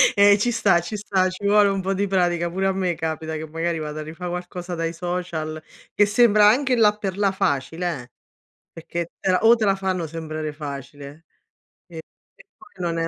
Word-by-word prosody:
Ehm, 200 0 +6
ci 240 +4 0
sta, 200 -6 +3
ci 175 +5 -6
sta, 195 -2 0
ci 185 +2 -8
vuole 205 0 +5
un 195 -1 -1
po' 190 +1 -1
di 200 +1 -1
pratica. 175 -2 +1
Pure 190 +3 -1
a - - +2
me 185 -2 -1
capita 160 0 -4
che 155 +1 -5
magari 165 +1 -2
vada 150 0 -5
a - - -5
rifà 165 +3 -7
qualcosa 180 0 -5
dai 165 0 -2
social 170 -3 -4 0.3
che 205 - +4
sembra 210 -1 +5
anche, 255 +4 +3
là 210 -3 +4
per 195 -2 -4
là 200 -2 +2
facile, 165 -3 -2
eh, 120 - -19 0.6
perché 170 +1 -5
te 190 - -1
la 185 - +3
o 225 +1 +7
te 220 - -1
la 195 -1 +3
fanno 185 -3 -2
sembrare 155 -1 -5
facile 145 +1 -9 0.6
e 165 -2 -9 0.3
e - - -19
poi 360 - -18
non 170 -1 -1
è 165 0 0
180 Hz, 205 wpm, -23 LUFS, 160-200 Hz, 0.6 s, o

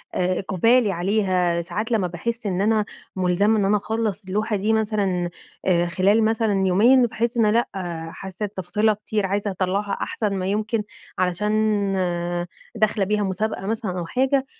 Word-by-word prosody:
إقبالي 195 +5 +2
عليها، 180 -2 +1
ساعات 210 +8 -4
لمَّا 200 -5 +2
باحس 230 +7 -4
إن 190 -1 0
أنا 215 0 +2 0.3
ملزمة 190 +4 +2
إن 195 - +2
أنا 210 +1 +3
أخلَّص 215 -1 -2
اللوحة 210 +3 -1
دي 210 +3 +1
مثلًا 200 -5 0 0.4
آآ 175 -2 +3
خلال 200 +5 +3
مثلًا 220 -3 +1
يومين 240 +7 +5
باحس 235 +1 -2
إن 225 - +4
لأ 235 +2 +2 0.4
حاسّة 190 +2 -6
تفاصيلها 210 +2 0
كتير، 210 -1 -2
عايزة 200 +1 -1
أطلَّعها 195 +2 -1
أحسن 210 -3 -2
ما 185 -1 -2
يمكن، 215 +2 -1 0.4
علشان 205 +2 +1 0.8
داخلة 215 -2 +1
بيها 210 +1 0
مسابقة 195 +1 -2
مثلًا 210 -4 -2
أو 170 - -3
حاجة 265 +6 +1
205 Hz, 150 wpm, -23 LUFS, 185-220 Hz, 0.8 s, يومين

